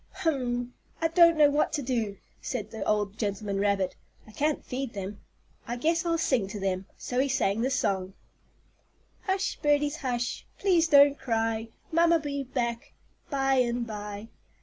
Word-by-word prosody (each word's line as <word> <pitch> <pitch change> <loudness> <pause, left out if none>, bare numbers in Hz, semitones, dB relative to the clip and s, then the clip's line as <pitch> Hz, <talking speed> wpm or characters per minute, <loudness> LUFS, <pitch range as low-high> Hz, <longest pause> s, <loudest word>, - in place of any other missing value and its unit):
"Hum! 250 -8 -1 0.3
I 325 - +1
don't 335 -1 +6
know 295 -1 +6
what 295 +1 +2
to 290 - -1
do," 230 -6 -1 0.2
said 215 -5 -4
the 220 - -4
old 210 0 0
gentleman 200 -1 -2
rabbit. 200 -2 +1 0.3
"I 215 - -14
can't 295 +7 -1
feed 255 -1 -4
them. 200 0 -6 0.5
I 240 - -2
guess 330 +7 +1
I'll 335 0 +2
sing 260 -10 +1
to 205 +2 -6
them." 190 0 -2
So 245 - -3
he 275 +1 +2
sang 220 -5 +1
this 260 +2 +1
song: 190 -3 -1 1.1
"Hush, 385 0 -1
birdies, 295 0 +2
hush, 245 -4 -3
Please 350 -4 +3
don't 285 -2 +6
cry; 225 -1 -1 0.2
Mamma'll 335 +1 +5
be 285 -3 -3
back 240 -3 -3 0.4
By 270 -2 +2
and 240 -1 +1
by. 210 0 -7
245 Hz, 160 wpm, -28 LUFS, 210-290 Hz, 1.1 s, don't